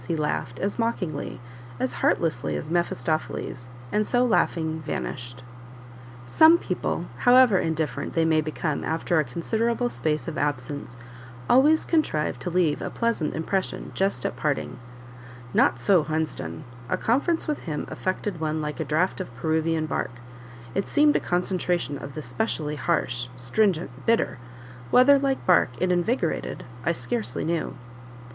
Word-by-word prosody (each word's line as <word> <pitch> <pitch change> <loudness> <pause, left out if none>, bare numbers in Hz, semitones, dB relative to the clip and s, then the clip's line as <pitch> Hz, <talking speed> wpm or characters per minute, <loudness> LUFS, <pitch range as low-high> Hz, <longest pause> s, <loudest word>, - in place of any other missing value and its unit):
he 165 - 0
laughed, 145 -4 -2
as 200 - -2
mockingly, 190 -10 -2 0.4
as 130 0 -1
heartlessly 155 -8 +1
as 155 - -5
Mephistopheles, 155 -5 -2 0.2
and 210 0 +1
so 245 0 +3
laughing, 160 -8 +1
vanished. 125 -4 -5 0.8
Some 315 - +7
people, - - -2
however 245 -5 +6
indifferent 155 -4 -2
they 165 -1 +3
may 160 -1 +3
become 155 0 -2
after 165 +1 0
a - - +3
considerable 230 - -1
space 155 -8 -1
of 165 0 -3
absence, 145 -2 -3 0.5
always 295 +5 +5
contrive 155 - 0
to 135 - -4
leave 175 -4 +1
a - - -3
pleasant 230 -10 -1
impression 185 +4 -2
just 195 -10 0
at - - -1
parting; 140 -1 -2 0.7
not - - +4
so 175 +8 +4
Hunsden, 155 - -3 0.3
a - - +1
conference 285 +8 +1
with 300 - -1
him 150 -4 -4
affected 185 -1 -3
one 155 0 -1
like 150 0 -4
a - - 0
draught 160 +6 0
of 180 - -7
Peruvian 160 +4 0
bark; 155 - -2 0.6
it 195 - -1
seemed 295 0 +4
a - - +4
concentration 175 -4 -1
of 140 -1 -8
the 155 - -5
specially 150 - -2
harsh, 120 -3 -1
stringent, 160 - +1 0.2
bitter; 225 - +2 0.5
whether, 275 - +6
like 270 -1 -1
bark, 180 -7 +5
it 185 0 +1
invigorated, 180 0 -1 0.2
I 170 - +2
scarcely 120 -5 -2
knew. 165 -4 -1
160 Hz, 145 wpm, -25 LUFS, 145-200 Hz, 0.8 s, Some